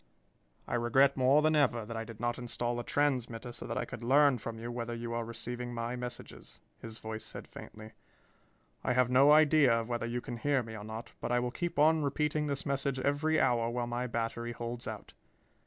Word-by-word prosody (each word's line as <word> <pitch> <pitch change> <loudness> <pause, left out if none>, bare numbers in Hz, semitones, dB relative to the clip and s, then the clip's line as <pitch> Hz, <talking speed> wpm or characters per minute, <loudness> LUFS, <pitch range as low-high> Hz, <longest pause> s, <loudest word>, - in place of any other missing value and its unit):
"I - - -4
regret 125 +4 +4
more 135 +3 +4
than 155 0 +3
ever 120 -6 +2
that 115 +1 -6
I 115 0 -3
did 115 -2 -10
not 120 0 -1
install 120 0 -2
a - - -3
transmitter 125 -5 -1
so - - -7
that - - -3
I - - -1
could 115 - -8
learn 140 +1 +5
from 115 +1 -6
you 115 +1 -5
whether 120 -1 -4
you 115 0 -5
are 115 0 -1
receiving 120 +1 -5
my 115 +1 -3
messages," 125 0 -7 0.2
his 115 -1 -9
voice 110 -1 -6
said - - -8
faintly. 110 0 -11 0.9
"I 125 - +1
have 125 0 +3
no 135 +3 +6
idea 150 -5 +6
of 115 - -8
whether 120 -1 -2
you 120 +1 -2
can 120 -1 -6
hear 140 0 +1
me 110 -1 -8
or 105 - -7
not, 110 +2 -7
but - - -3
I 120 - +3
will 120 0 -2
keep 175 +5 -3
on 155 +2 +5
repeating 150 +1 0
this 140 -1 -2
message 140 -1 -1
every 145 +4 +1
hour 115 -2 +2
while 120 0 -2
my 120 +1 -2
battery 115 0 -3
holds 120 +1 -5
out. - - -7
120 Hz, 215 wpm, -32 LUFS, 115-140 Hz, 0.9 s, no